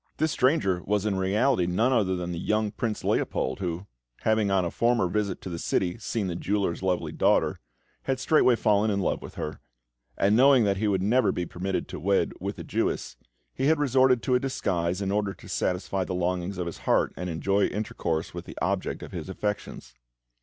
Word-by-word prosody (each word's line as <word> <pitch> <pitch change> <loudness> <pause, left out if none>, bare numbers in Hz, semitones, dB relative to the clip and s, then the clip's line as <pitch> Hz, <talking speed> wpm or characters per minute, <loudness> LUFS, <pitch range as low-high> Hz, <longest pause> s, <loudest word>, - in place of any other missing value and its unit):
This 155 0 +1
stranger 130 - +2
was 105 0 0
in 105 - +1
reality 95 +2 +2
none 110 +9 +2
other 100 -6 +2
than 90 -1 -4
the 85 - -4
young 105 +2 0
Prince 110 -1 -3
Leopold, 65 - 0
who, 90 0 -3 0.4
having 110 -2 +2
on 95 -2 +2
a 85 - -2
former 120 -5 +2
visit 100 0 -2
to - - -6
the 85 - -4
city 90 0 -1
seen 110 -4 -2
the 90 -2 -3
jeweller's 95 -1 -1
lovely 95 -2 -1
daughter, - - +2 0.5
had 135 -1 0
straightway 135 -3 +4
fallen 105 -1 +2
in 100 -1 0
love 95 - -1
with - - -10
her; 75 - -5 0.6
and 100 +2 +3
knowing 130 0 +6
that 100 -2 +1
he 105 +2 0
would 95 -2 +1
never 125 +6 +3
be 90 - -2
permitted 95 +3 -3
to - - -7
wed 95 +4 +1
with - - -4
a - - -6
Jewess, - - -2 0.4
he 135 - 0
had 160 +1 +4
resorted 130 -3 +3
to 130 - +1
a 125 - +4
disguise 95 -8 -1
in 95 - -1
order 100 -1 0
to - - -14
satisfy 95 +1 -1
the 90 - -4
longings 90 +1 -1
of 90 - -2
his 85 - -6
heart, - - +3
and 90 - -4
enjoy 95 +5 +1
intercourse 85 -6 -3
with - - -7
the - - -10
object - - -2
of - - -9
his - - -6
affections. 100 -10 -4
100 Hz, 205 wpm, -27 LUFS, 90-110 Hz, 0.6 s, knowing